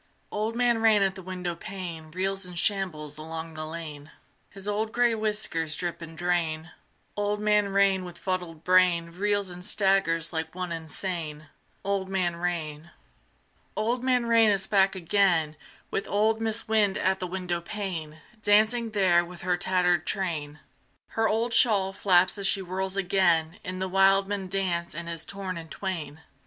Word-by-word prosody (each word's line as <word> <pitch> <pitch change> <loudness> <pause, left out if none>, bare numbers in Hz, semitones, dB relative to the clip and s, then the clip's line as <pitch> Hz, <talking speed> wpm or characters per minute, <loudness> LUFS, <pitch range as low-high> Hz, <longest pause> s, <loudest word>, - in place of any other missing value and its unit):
Old 215 +2 -2
Man 240 -1 +2
Rain 220 -3 +4
at 195 -1 +1
the 190 - -9
windowpane 180 -2 -6
Reels 190 +3 -2
and 180 -1 -9
shambles 160 -7 -1
along 160 +1 -6
the 155 0 -5
lane: 155 -3 -8 0.4
His 195 0 -9
old 215 +1 -1
gray 240 -1 +3
whiskers 210 -8 +3
drip 175 -1 -4
and 165 -1 -9
drain: 170 -2 -1 0.4
Old 205 0 -1
Man 210 -1 +2
Rain 195 -1 +3
with 175 -1 -9
fuddled 180 -4 -4
brain 180 -2 +3
Reels 200 +1 -1
and 175 0 -9
staggers 190 -5 +2
like 160 0 -4
one 180 -1 -4
insane. 160 -2 -5 0.3
Old 195 -1 -1
Man 180 -3 0
Rain. 170 -2 -4 0.9
Old 235 +4 0
Man 250 -2 +2
Rain 230 -1 +5
is 195 -2 +2
back 195 -1 +3
again, 175 -4 +1 0.4
With 195 - -2
old 220 +2 +1
Mis' 225 0 +1
Wind 210 -3 +2
at 190 +1 +1
the 185 - -3
windowpane, 175 -3 -4 0.2
Dancing 220 +2 +3
there 180 -4 +4
with 175 0 -11
her 180 0 +1
tattered 180 -1 +1
train: 160 -6 -2 0.5
Her 225 0 0
old 230 +2 0
shawl 200 -5 +4
flaps 185 0 +3
as 195 - +1
she 195 - +2
whirls 190 +1 -3
again 175 -4 +2
In 185 0 -5
the 190 0 -2
wildman 195 +1 +2
dance 180 -3 -2
and 170 +1 -6
is 165 -1 -1
torn 190 -3 -5
in 165 -1 -11
twain. 160 -6 -5
185 Hz, 160 wpm, -27 LUFS, 170-200 Hz, 0.9 s, Rain